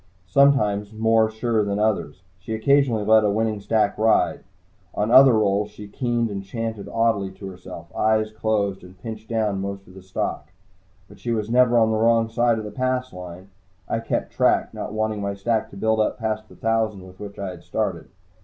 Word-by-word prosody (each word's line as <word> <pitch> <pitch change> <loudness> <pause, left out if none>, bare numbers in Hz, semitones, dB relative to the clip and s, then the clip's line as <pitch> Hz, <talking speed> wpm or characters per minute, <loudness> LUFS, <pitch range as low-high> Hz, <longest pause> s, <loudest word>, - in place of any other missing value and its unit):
Sometimes 105 -2 +3
more 110 0 +3
sure 110 0 0
than 100 0 -1
others, 100 -6 -1 0.2
she 110 +4 -5
occasionally 120 -2 +2
let 110 0 +5
a 105 - +2
winning 110 0 0
stack 105 0 +1
ride. 110 0 +3 0.6
On 105 +2 0
other 130 0 +8
rolls, 105 -1 +1
she 105 0 -11
keened 120 +1 -1
and 100 -1 -4
chanted 110 -1 -5
oddly 115 -4 +1
to 95 0 -9
herself, 90 -2 -11
eyes 110 0 +1
closed, 105 -3 -1
and 90 0 -15
pinched 110 -1 -8
down 105 -4 0
most 100 0 -5
of 90 - -16
the 95 - -12
stock. 95 -5 -4 0.6
But 100 0 -16
she 120 - -5
was 110 -1 -1
never 120 -1 +4
on 110 -1 +4
the 110 - +1
wrong 115 0 +3
side 120 0 +2
of 110 - -5
the 105 - -6
"Pass" 130 +1 -2
line. 90 +1 -9 0.4
I - - -1
kept 115 - -3
track, - - +2
not - - -5
wanting 110 -1 -2
my 100 0 -2
stack 110 +2 -1
to 100 - -12
build 110 +2 +1
up 110 - +1
past 110 -1 -3
the - - -15
thousand 110 -4 -1
with 95 0 -15
which 100 -1 -8
I 100 -2 -4
had 90 -2 -11
started. - - -3
110 Hz, 200 wpm, -23 LUFS, 100-115 Hz, 0.6 s, other